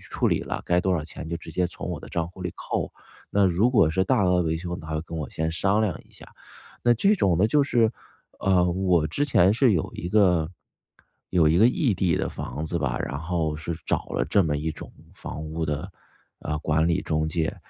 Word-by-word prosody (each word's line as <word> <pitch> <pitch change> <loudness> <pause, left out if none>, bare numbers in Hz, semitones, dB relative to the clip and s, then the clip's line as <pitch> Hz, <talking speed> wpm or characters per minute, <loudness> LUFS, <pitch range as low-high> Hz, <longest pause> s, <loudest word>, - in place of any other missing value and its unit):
处 - - -2
理 - - +2
了， - - -4
该 90 0 +3
多 95 0 +1
少 80 -4 -1
钱 80 0 -8
就 85 - -2
直 80 -1 -11
接 90 - +1
从 - - -7
我 - - -4
的 - - -11
账 85 0 -2
户 90 +1 -11
里 90 - -3
扣。 - - -3 0.4
那 100 -1 +3
如 95 +7 +2
果 110 -10 +4
是 95 +4 +1
大 95 +1 +2
额 90 -1 +3
维 80 0 -1
修， 90 0 -5
它 80 - -10
会 75 - -1
跟 85 0 -7
我 75 -5 -4
先 80 +1 -2
商 100 +5 +1
量 105 -4 0
一 - - -26
下。 - - -13 0.6
那 120 - +5
这 195 - +3
种 95 - +2
呢， 100 - +4
就 145 +5 +3
是 120 -4 +2 0.5
呃， 95 -2 +3
我 90 -4 +2
之 140 - -1
前 100 -7 +4
是 120 -2 +4
有 80 - -1
一 85 - -5
个 90 -6 +3 0.8
有 85 -4 +4
一 80 - +3
个 110 - +7
异 125 -2 +1
地 90 -3 +1
的 - - -1
房 75 - -5
子 85 +2 -2
吧， 65 -5 -1
然 70 - -3
后 80 -2 -2
是 80 +2 -4
找 - - -1
了 65 - 0
这 95 +7 +3
么 75 -3 0
一 80 +2 -2
种 - - -10 0.2
房 75 - -7
屋 80 +1 -3
的， 75 -2 -3 0.5
呃， 75 0 -3
管 80 +1 +1
理 85 - +1
中 80 0 -1
介。 80 0 -1
85 Hz, 250 characters per minute, -25 LUFS, 80-95 Hz, 0.8 s, 个